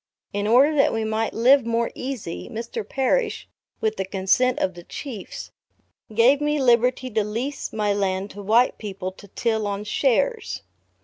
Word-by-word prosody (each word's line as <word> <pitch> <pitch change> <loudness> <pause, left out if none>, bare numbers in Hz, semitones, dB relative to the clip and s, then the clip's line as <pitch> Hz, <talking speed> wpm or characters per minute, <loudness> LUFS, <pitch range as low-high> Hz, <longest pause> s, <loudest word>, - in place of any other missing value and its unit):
In 205 +1 -1
order 265 +7 +5
that 275 - +3
we 225 0 -1
might 220 +1 -1
live 255 +4 +5
more 230 0 0
easy, 235 - -5
Mr. 230 -1 -5
Parrish, 340 - 0 0.3
with 220 0 0
the 190 - 0
consent 195 +7 +2
of 185 - 0
the 175 - -10
chiefs, 230 - -7 0.6
gave 255 +6 +5
me 295 0 +1
liberty 250 0 +2
to 215 -1 +1
lease 235 +7 -4
or - - -11
my 210 -2 +1
land 195 0 -1
to 205 - -9
white 225 +5 +3
people 195 -3 -5
to 195 +2 -15
till 220 +1 -1
on 200 0 -3
shares. 290 - 0
225 Hz, 170 wpm, -23 LUFS, 205-255 Hz, 0.6 s, order